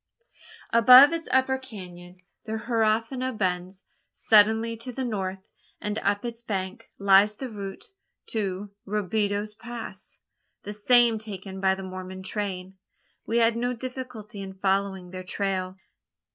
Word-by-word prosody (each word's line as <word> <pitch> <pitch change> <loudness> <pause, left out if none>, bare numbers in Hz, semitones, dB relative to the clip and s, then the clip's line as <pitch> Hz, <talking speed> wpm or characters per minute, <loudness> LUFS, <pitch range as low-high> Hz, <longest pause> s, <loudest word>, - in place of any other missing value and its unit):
Above 255 +6 +9
its 330 -1 -3
upper 260 0 +2
canon 180 -7 -10 0.3
the 220 - -4
Huerfano 225 +3 0
bends 185 0 -2 0.3
suddenly 220 +2 +4
to 230 +3 -7
the 260 +1 -3
north; 190 -4 -4 0.3
and 210 +1 -3
up 205 +3 0
its 235 -1 -5
bank 190 -4 -4
lies 200 +1 +5
the 265 - -5
route 205 - -8 0.3
to 200 -2 -3 0.2
Robideau's 210 +1 -1
Pass 235 +1 -9 0.5
the 205 - -6
same 230 +1 +4
taken 195 -3 -8
by 190 0 +3
the 195 - -7
Mormon 185 0 -7
train. 190 -1 -3 0.5
We 230 - +1
had 230 0 +4
no 245 +1 -1
difficulty 245 -4 -7
in 190 -1 -7
following 190 -1 -1
their 185 0 -6
trail. 185 -1 -2
210 Hz, 130 wpm, -26 LUFS, 190-230 Hz, 0.5 s, Above